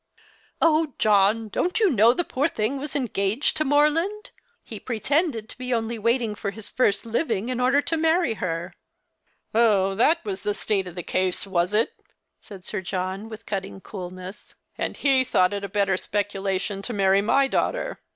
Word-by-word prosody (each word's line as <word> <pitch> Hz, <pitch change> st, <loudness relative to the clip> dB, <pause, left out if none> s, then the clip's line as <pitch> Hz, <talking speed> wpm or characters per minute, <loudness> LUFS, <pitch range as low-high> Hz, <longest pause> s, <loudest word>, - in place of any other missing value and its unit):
" -, -, -34 dB
Oh, 315 Hz, -3 st, +3 dB
John! 215 Hz, +1 st, +3 dB
don't 360 Hz, -, -1 dB
you 420 Hz, -5 st, +4 dB
know 230 Hz, -2 st, +5 dB
the 350 Hz, +8 st, -1 dB
poor 285 Hz, -2 st, 0 dB
thing 270 Hz, -3 st, -2 dB
^vas 290 Hz, +1 st, -6 dB
engaged 225 Hz, -2 st, 0 dB
to 310 Hz, -, +2 dB
Morland? 310 Hz, +8 st, +1 dB, 0.3 s
He -, -, -8 dB
pretended 255 Hz, 0 st, -1 dB
to -, -, -10 dB
be 255 Hz, 0 st, -4 dB
only 230 Hz, 0 st, -2 dB
waiting 230 Hz, 0 st, +1 dB
for 205 Hz, -1 st, -4 dB
his 215 Hz, +1 st, -9 dB
first 210 Hz, -3 st, +1 dB
living 230 Hz, -2 st, -1 dB
in 250 Hz, -1 st, -2 dB
order 265 Hz, +3 st, +3 dB
to 330 Hz, -, -1 dB
marry 320 Hz, -4 st, +2 dB
her." 175 Hz, -3 st, -4 dB, 0.4 s
" -, -, -45 dB
Oh, 210 Hz, -4 st, +3 dB
that 240 Hz, -, +2 dB
was 195 Hz, -2 st, -4 dB
the 205 Hz, 0 st, -1 dB
state 195 Hz, -3 st, -1 dB
of 175 Hz, -, -9 dB
the 175 Hz, -, -5 dB
case, 185 Hz, +2 st, 0 dB
was 185 Hz, +1 st, 0 dB
it? 225 Hz, -, +2 dB, 0.3 s
" -, -, -54 dB
said 195 Hz, -4 st, -12 dB
Sir 210 Hz, -, -3 dB
John, 190 Hz, +3 st, -4 dB
with 220 Hz, -1 st, -10 dB
cutting 195 Hz, -1 st, -4 dB
coolness. 185 Hz, 0 st, -9 dB
" -, -, -51 dB
And -, -, -3 dB
he 270 Hz, -2 st, +3 dB
thought 185 Hz, -7 st, +2 dB
it 200 Hz, 0 st, -3 dB
a 200 Hz, -, -4 dB
better 195 Hz, -1 st, +1 dB
speculation 195 Hz, -1 st, -2 dB
to 240 Hz, -, -4 dB
marry 195 Hz, -1 st, +3 dB
my 270 Hz, +6 st, +3 dB
daughter. -, -, -1 dB
215 Hz, 190 wpm, -24 LUFS, 195-270 Hz, 0.4 s, know